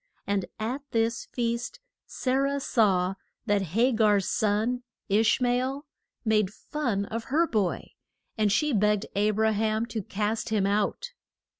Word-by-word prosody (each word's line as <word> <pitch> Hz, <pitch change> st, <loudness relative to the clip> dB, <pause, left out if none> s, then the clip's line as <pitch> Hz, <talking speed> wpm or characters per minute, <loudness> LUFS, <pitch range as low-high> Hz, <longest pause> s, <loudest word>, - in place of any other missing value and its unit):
And 200 Hz, -2 st, 0 dB
at 240 Hz, +6 st, -2 dB
this 230 Hz, -1 st, 0 dB
feast 235 Hz, -, -3 dB, 0.3 s
Sa 255 Hz, -, -2 dB
rah 275 Hz, +1 st, +1 dB
saw 195 Hz, -8 st, +2 dB, 0.3 s
that 205 Hz, -3 st, +2 dB
Ha 245 Hz, +4 st, +4 dB
gar's 210 Hz, -4 st, +3 dB
son, 220 Hz, +3 st, +1 dB, 0.3 s
Ish 215 Hz, +5 st, +3 dB
ma 250 Hz, -1 st, +2 dB
el, 260 Hz, +4 st, -1 dB, 0.4 s
made 215 Hz, -3 st, +2 dB
fun 220 Hz, -4 st, -2 dB
of 225 Hz, +2 st, -5 dB
her 315 Hz, +5 st, +2 dB
boy, 210 Hz, -, -1 dB, 0.4 s
and 215 Hz, -2 st, +2 dB
she 300 Hz, +8 st, +2 dB
begged 210 Hz, 0 st, +2 dB
A 205 Hz, +1 st, +3 dB
bra 220 Hz, +1 st, +2 dB
ham 215 Hz, +1 st, 0 dB
to 225 Hz, -2 st, -4 dB
cast 210 Hz, +3 st, -2 dB
him 210 Hz, -3 st, +1 dB
out. 205 Hz, -, 0 dB
220 Hz, 150 wpm, -27 LUFS, 205-245 Hz, 0.4 s, Ha